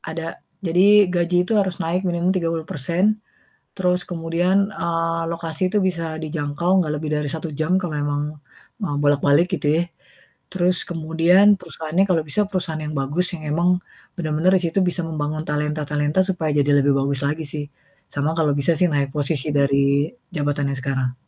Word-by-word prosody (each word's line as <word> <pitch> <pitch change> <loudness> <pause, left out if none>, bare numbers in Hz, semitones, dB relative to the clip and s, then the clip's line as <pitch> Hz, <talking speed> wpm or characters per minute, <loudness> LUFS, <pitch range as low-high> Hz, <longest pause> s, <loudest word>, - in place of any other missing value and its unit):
Ada. 165 0 -6 0.2
Jadi 190 +3 +5
gaji 175 0 +1
itu 225 - -3
harus 190 -3 0
naik 180 +3 -1
minimum 175 +1 0
30% 170 +3 0 0.6
terus 180 -1 +1
kemudian, 175 +2 0 0.2
eee, 165 -2 -1
lokasi 170 +2 -2
itu 210 - +1
bisa 165 -4 -2
dijangkau, 160 +4 0
gak 155 - -3
lebih 155 -1 -2
dari 150 -1 -1
1 160 +1 -4
jam 180 +4 +2
kalau 175 -5 -4
emang, 145 0 -1 0.6
eee, 145 -7 -1
bolak-balik 145 +3 +3
gitu 145 -3 -3
ya. 170 - +2 0.7
Terus 180 -1 +1
kemudian 170 +5 +4
perusahaannya 160 +4 -1
kalau 165 -3 +2
bisa 205 +8 +1
perusahaan 165 -5 -3
yang 150 - -4
bagus 150 +8 -1
yang 155 - -10
emang 170 +3 +2 0.5
bener-bener 160 +1 +1
di - - -1
situ 165 +4 0
bisa 175 - -2
membangun 155 -1 -3
talenta-talenta 150 +2 0
supaya 165 -5 -1
jadi 145 +1 +2
lebih 140 - +3
bagus 140 0 -1
lagi 155 +2 -2
sih. 145 0 -4 0.5
Sama 145 +2 0
kalau 155 -2 +2
bisa 165 +5 +2
sih 180 - +4
naik 140 -2 +1
posisi 145 0 0
dari 140 +2 +2 0.3
jabatan 145 -2 0
yang 135 - -3
sekarang. 130 -2 -1
160 Hz, 165 wpm, -22 LUFS, 145-180 Hz, 0.7 s, Jadi